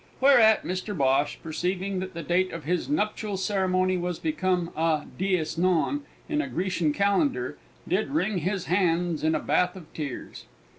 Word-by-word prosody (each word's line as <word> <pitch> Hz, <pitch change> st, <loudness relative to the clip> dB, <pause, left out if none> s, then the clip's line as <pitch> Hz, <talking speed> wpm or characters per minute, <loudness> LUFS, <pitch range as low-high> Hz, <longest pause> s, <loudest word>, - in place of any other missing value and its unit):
Whereat 245 Hz, -5 st, +6 dB
Mr 185 Hz, +2 st, -3 dB
Bhosh, 135 Hz, +1 st, +2 dB
perceiving 185 Hz, +4 st, -2 dB
that 185 Hz, -1 st, -6 dB
the 170 Hz, -, -4 dB
date 185 Hz, +2 st, +1 dB
of 165 Hz, -2 st, -6 dB
his 175 Hz, -, -1 dB
nuptial 210 Hz, -6 st, -1 dB
ceremony 185 Hz, -2 st, +1 dB
was 175 Hz, -1 st, -2 dB
become 185 Hz, -, -1 dB
a 160 Hz, -2 st, +1 dB
dies 180 Hz, -4 st, 0 dB
non 185 Hz, -, +1 dB, 0.2 s
in 305 Hz, -1 st, 0 dB
a -, -, -4 dB
Grecian 180 Hz, -3 st, 0 dB
calendar, 200 Hz, -, +1 dB, 0.3 s
did -, -, 0 dB
wring 215 Hz, -, 0 dB
his 185 Hz, +2 st, -2 dB
hands 175 Hz, -3 st, +1 dB
in 160 Hz, 0 st, +2 dB
a -, -, +1 dB
bath 180 Hz, 0 st, +1 dB
of 175 Hz, -5 st, -12 dB
tears. 145 Hz, -5 st, -6 dB
185 Hz, 160 wpm, -26 LUFS, 170-200 Hz, 0.3 s, Whereat